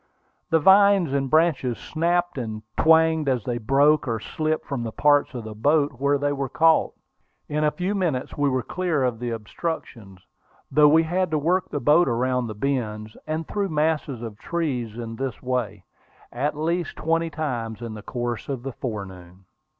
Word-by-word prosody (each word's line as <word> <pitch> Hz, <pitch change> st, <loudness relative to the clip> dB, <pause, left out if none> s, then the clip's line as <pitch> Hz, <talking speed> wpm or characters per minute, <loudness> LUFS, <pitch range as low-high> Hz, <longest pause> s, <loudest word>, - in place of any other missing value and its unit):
The 165 Hz, -, +4 dB
vines 190 Hz, -2 st, +5 dB
and 135 Hz, -1 st, 0 dB
branches 155 Hz, -6 st, +2 dB
snapped 175 Hz, +2 st, -1 dB
and 110 Hz, -3 st, -5 dB
twanged 160 Hz, -2 st, +4 dB
as 125 Hz, -4 st, 0 dB
they 120 Hz, 0 st, -2 dB
broke 140 Hz, +6 st, +3 dB
or 115 Hz, -2 st, -1 dB
slipped 155 Hz, +7 st, -2 dB
from 135 Hz, -4 st, -3 dB
the 115 Hz, -1 st, -4 dB
parts 145 Hz, +1 st, +2 dB
of 120 Hz, -, -5 dB
the 110 Hz, 0 st, -7 dB
boat 145 Hz, +6 st, +2 dB
where 140 Hz, +1 st, +2 dB
they 145 Hz, 0 st, 0 dB
were 135 Hz, -2 st, -3 dB
caught. 160 Hz, +3 st, +3 dB, 0.5 s
In 150 Hz, +1 st, -1 dB
a 150 Hz, -, +4 dB
few 185 Hz, +5 st, -2 dB
minutes 170 Hz, -10 st, -2 dB
we 145 Hz, -1 st, +1 dB
were 130 Hz, -2 st, -1 dB
clear 175 Hz, -6 st, -1 dB
of 125 Hz, -3 st, -1 dB
the 120 Hz, 0 st, -3 dB
obstructions, 115 Hz, -, -6 dB, 0.5 s
though 150 Hz, -1 st, +6 dB
we 160 Hz, +2 st, +5 dB
had 180 Hz, +2 st, 0 dB
to 155 Hz, -, 0 dB
work 180 Hz, +5 st, 0 dB
the 145 Hz, -, -3 dB
boat 155 Hz, +5 st, +4 dB
around 125 Hz, 0 st, 0 dB
the 110 Hz, -, -6 dB
bends, 110 Hz, -4 st, -3 dB
and 155 Hz, +1 st, -3 dB
through 200 Hz, -2 st, -2 dB
masses 150 Hz, -5 st, -1 dB
of 110 Hz, -3 st, -7 dB
trees 130 Hz, -10 st, -3 dB
in 115 Hz, -1 st, -6 dB
this 135 Hz, -3 st, -4 dB
way, 125 Hz, -6 st, -2 dB, 0.5 s
at 145 Hz, +5 st, -2 dB
least 170 Hz, +3 st, -1 dB
twenty 165 Hz, +1 st, 0 dB
times 120 Hz, -8 st, -4 dB
in 115 Hz, -2 st, -6 dB
the 105 Hz, -, -8 dB
course 120 Hz, +2 st, -4 dB
of 130 Hz, -3 st, -4 dB
the 135 Hz, -1 st, -5 dB
forenoon. 95 Hz, -6 st, -7 dB
140 Hz, 180 wpm, -24 LUFS, 120-160 Hz, 0.5 s, though